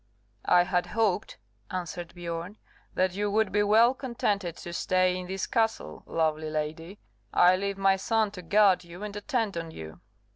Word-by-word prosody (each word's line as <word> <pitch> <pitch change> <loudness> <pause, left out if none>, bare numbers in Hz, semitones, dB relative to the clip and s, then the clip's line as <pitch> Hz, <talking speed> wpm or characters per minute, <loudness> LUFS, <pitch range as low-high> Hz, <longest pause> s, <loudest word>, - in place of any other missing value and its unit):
"I 180 0 +6
had 180 0 0
hoped," 215 -4 0 0.3
answered 175 -1 -5
Biorn, 175 +3 -5 0.4
"that 185 -1 +1
you 205 +2 -1
would 215 0 +1
be 205 - +2
well 220 +4 +5
contented 205 - -2
to 175 - -8
stay 185 +1 +2
in 180 0 -5
this 190 +1 -3
castle, 225 -1 -1
lovely 155 -1 0
lady; 155 +5 -4 0.3
I 180 +1 +5
leave 200 +1 -3
my 195 0 +3
son 220 +1 +1
to 190 -3 -9
guard 195 +1 +4
you 175 +3 -10
and 210 -1 -6
attend 215 - -2
on 165 -1 -4
you." 80 - -10
185 Hz, 170 wpm, -28 LUFS, 175-210 Hz, 0.4 s, I